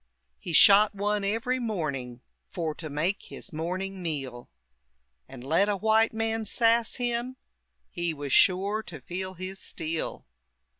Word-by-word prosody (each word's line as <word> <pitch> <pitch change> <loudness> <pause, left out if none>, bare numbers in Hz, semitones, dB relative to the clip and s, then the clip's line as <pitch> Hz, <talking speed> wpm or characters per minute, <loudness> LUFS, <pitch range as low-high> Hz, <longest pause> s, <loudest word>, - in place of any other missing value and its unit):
He - - -6
shot 205 +5 +7
one 205 +1 0
every 230 +5 0
morning, 140 - -3 0.2
For 165 -3 -4
to 155 0 -8
make 160 +8 -1
his - - -8
morning 185 +4 -4
meal. 135 -7 -5 0.8
And 130 -2 -11
let 165 +9 +2
a 205 - 0
white 220 +2 +3
man 225 0 -1
sass 230 +1 +2
him, 245 +1 -2 0.5
He 175 -1 -2
was 145 -3 -4
shore 200 +3 +4
to 175 -8 -9
feel 185 +7 -5
his 185 +2 -6
steel. 160 0 -4
190 Hz, 140 wpm, -27 LUFS, 160-220 Hz, 0.8 s, shot